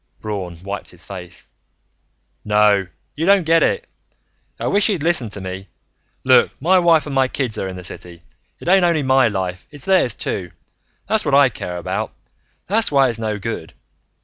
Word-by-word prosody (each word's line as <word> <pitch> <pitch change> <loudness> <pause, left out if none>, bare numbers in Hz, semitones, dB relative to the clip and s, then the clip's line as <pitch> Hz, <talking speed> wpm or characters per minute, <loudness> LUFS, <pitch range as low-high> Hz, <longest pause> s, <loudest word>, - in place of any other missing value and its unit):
Braun 95 -5 -5
wiped 100 0 -6
his 90 0 -13
face. 90 -2 -10 1.0
"No. 105 -2 +3 0.3
You 160 +4 -2
don't 200 -2 +5
get 165 +1 +4
it. 475 - +1 0.7
I - - -4
wish 205 +2 +3
you'd 185 -8 -1
listen 160 -9 +1
to 105 - -6
me. 95 +1 -7 0.6
Look, - - +5
my 185 +6 +4
wife 165 -4 +4
and 145 - -5
my 135 -1 +3
kids 130 -4 -2
are 95 - -2
in 95 - -6
the 90 - -8
city. 85 -1 -8 0.4
It - - -11
ain't 190 +1 +5
only 170 -4 +2
my 130 -1 +4
life, 95 -3 -4
it's 145 -3 -9
theirs, 185 - +2
too. 90 -4 -3 0.5
That's 220 -1 +1
what 145 -3 +2
I 140 -1 +6
care 90 -6 -6
about. 85 - -3 0.5
That's 220 +1 +1
why 135 -2 +4
it's 115 -1 -4
no 110 -2 -2
good. 100 -6 -6
120 Hz, 180 wpm, -20 LUFS, -, 1.0 s, I